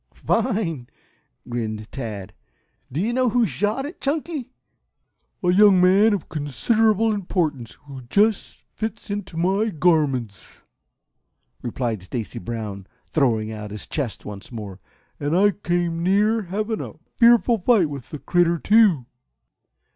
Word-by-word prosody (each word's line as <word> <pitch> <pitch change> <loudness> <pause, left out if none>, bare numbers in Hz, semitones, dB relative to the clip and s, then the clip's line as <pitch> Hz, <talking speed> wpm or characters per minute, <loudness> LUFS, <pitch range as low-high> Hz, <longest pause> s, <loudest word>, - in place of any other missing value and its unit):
"Fine!" 170 - -1 0.6
grinned 110 -3 -4
Tad. 110 -7 -6 0.6
"Do 140 - -3
you 220 +6 0
know 255 0 +2
who 240 +1 +3
shot 210 - -1
it, 300 - -9
Chunky?" 295 -1 -2 0.9
"A 180 - +3
young 200 -1 +6
man 195 +5 +5
of 190 - -6
considerable 215 - +1
importance, 160 - -2
who 135 -2 -9
just 210 - +1
fits 220 -1 -5
into 200 -5 -5
my 195 +6 +1
garments," 145 - 0 1.0
replied 120 -3 -3
Stacy 110 +4 -5
Brown, 100 -2 -6 0.2
throwing 115 -7 +1
out 105 -1 -7
his 105 0 -7
chest 135 -8 -4
once 100 +1 -9
more. 105 -5 -7 0.4
"And 145 +4 0
I 205 +2 +5
came 175 -4 -1
near 210 +5 +2
having 210 +4 -3
a - - -7 0.2
fearful 235 -1 +5
fight 195 -3 +3
with 140 -4 -8
the 150 - -6
critter, 170 +2 +2
too." 195 - +4
175 Hz, 130 wpm, -23 LUFS, -, 1.0 s, young